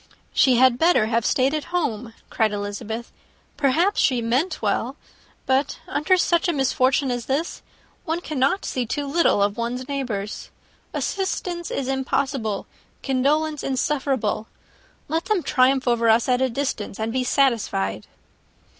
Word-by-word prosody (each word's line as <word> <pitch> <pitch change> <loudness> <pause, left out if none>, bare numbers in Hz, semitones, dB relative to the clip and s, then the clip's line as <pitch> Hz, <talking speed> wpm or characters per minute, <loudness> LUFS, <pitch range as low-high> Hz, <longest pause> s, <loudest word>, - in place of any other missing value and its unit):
"She 260 -3 +4
had 250 0 +4
better 330 -10 +4
have 230 0 0
stayed 265 +2 +2
at 305 -1 -2
home," 250 -10 -2 0.2
cried 220 -2 +1
Elizabeth: 205 +3 -5 0.4
"perhaps 330 +9 +2
she 255 -2 +3
meant 250 +10 0
well, - - -1 0.5
but, 265 +2 +1
under 370 0 +2
such 345 0 +2
a 345 - +1
misfortune 265 -1 +2
as 245 -1 -3
this, 290 +6 -2 0.4
one 325 +2 -2
cannot 300 +2 0
see 250 -2 -2
too 290 +5 -2
little 280 -8 +3
of 205 0 0
one's 245 +2 -3
neighbours. 235 -8 -4 0.4
Assistance 360 -3 -2
is 270 - -3
impossible; 265 -5 -1 0.4
condolence, 295 +3 +1
insufferable. 265 -5 -1 0.6
Let 320 +3 -1
them 420 -6 0
triumph 260 -1 +2
over 235 -1 +3
us 225 +1 +4
at 250 0 +2
a 260 - +2
distance, 230 -6 -3
and 220 +1 -2
be 260 0 0
satisfied." 225 - 0
260 Hz, 140 wpm, -23 LUFS, 230-295 Hz, 0.6 s, She